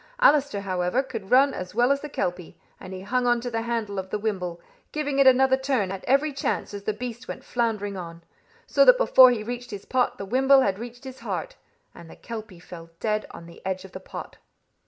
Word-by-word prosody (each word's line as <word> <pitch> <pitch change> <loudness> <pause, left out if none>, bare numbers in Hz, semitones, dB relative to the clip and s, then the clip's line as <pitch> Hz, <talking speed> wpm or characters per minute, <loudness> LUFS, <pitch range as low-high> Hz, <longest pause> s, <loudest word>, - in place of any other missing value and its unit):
Allister, 285 - +4
however, 185 +5 0
could 225 -7 -7
run 270 +2 +5
as 185 +2 -7
well 245 +3 +3
as 280 0 +1
the 300 - -6
kelpie, 180 - -4 0.2
and 185 - -10
he 185 0 -7
hung 245 +5 0
on 240 0 +3
to 245 0 -5
the 225 0 -1
handle 225 -4 -2
of 190 0 -6
the 210 - -1
wimble, 185 -5 -3 0.3
giving 290 -2 -2
it 275 - +6
another 260 0 +5
turn 265 -8 0
at 195 -1 -6
every 280 +3 +2
chance 270 - -2
as 200 0 -7
the - - +1
beast 240 +2 -7
went - - -7
floundering 215 -4 -2
on; 170 -2 -8 0.4
so - - +4
that - - +7
before 260 - +7
he 235 -4 -1
reached 245 +2 -6
his 200 -1 -8
pot 250 -1 0
the 200 - -6
wimble 265 +5 +4
had 200 -5 0
reached 240 +2 -9
his 260 -1 -9
heart, - - -4 0.4
and 170 - -13
the - - -12
kelpie 215 -6 -8
fell 170 -1 -11
dead 215 -1 -1
on 170 - -11
the 170 - -14
edge 190 0 -3
of 190 - -13
the 185 - -8
pot. 190 - -9
230 Hz, 225 wpm, -25 LUFS, 190-260 Hz, 0.4 s, that